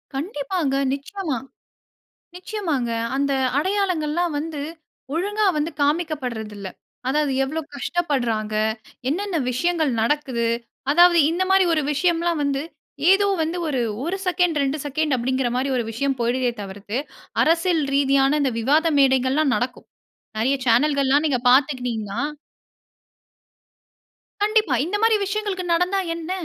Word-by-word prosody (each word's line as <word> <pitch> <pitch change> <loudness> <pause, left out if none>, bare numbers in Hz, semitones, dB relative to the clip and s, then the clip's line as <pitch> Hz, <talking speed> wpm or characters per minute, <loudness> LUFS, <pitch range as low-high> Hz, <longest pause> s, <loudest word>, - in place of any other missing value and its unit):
கண்டிப்பாங்க, 290 -1 -2 0.2
நிச்சயமா. 295 +1 -4 1.0
நிச்சயமாங்க 350 - -2 0.2
அந்த 280 +1 0 0.3
அடையாளங்கள்லாம் 345 -3 0
வந்து 310 -2 -5 0.5
ஒழுங்கா 410 +6 0
வந்து 300 +3 -1
காமிக்கப்படுறதில்ல. 255 - -2 0.4
அதாவது 290 +1 +1
எவ்வளவு 305 +3 -4
கஷ்டப்படுறாங்க, 245 -9 -1 0.5
என்னன்ன 375 +4 -1
விஷயங்கள் 320 +2 +1
நடக்குது, 240 -2 0 0.4
அதாவது 345 +2 +6
இந்த 345 +3 0
மாரி 385 -1 +5
ஒரு 310 - +2
விஷயம்லாம் 340 +1 +1
வந்து, 280 -1 0 0.5
ஏதோ 400 +1 +4
வந்து 325 +3 -1
ஒரு, 270 -5 0 0.2
1 350 +5 -2
செகண்ட் 355 -4 +2
2 275 +3 -1
செகண்ட் 295 0 0
அப்டிங்கிற 255 +1 0
மாரி 265 +2 0
ஒரு 240 - 0
விஷயம் 270 +3 -1
போய்டுதே 245 +1 +1
தவிர்த்து, 205 +3 -5 0.5
அரசியல் 330 0 +2
ரீதியான 275 +1 +3
இந்த 265 - +1
விவாத 290 +8 +3
மேடைகள்லாம் 265 +1 +3
நடக்கும். 250 +1 -3 0.5
நெறைய 265 +5 +2
சேனல்கள்லாம் 280 +4 +3
நீங்க 255 -4 +1
பார்த்துக்கிட்டூங்கனா 245 -6 +1 2.2
கண்டிப்பா, 425 - +2
இந்த 365 +5 -2
மாரி 450 0 +4
விஷயங்களுக்கு 395 -2 -2
நடந்தா 360 +3 +1 0.2
என்ன? 335 +1 -6
295 Hz, 115 wpm, -22 LUFS, 260-345 Hz, 2.2 s, அதாவது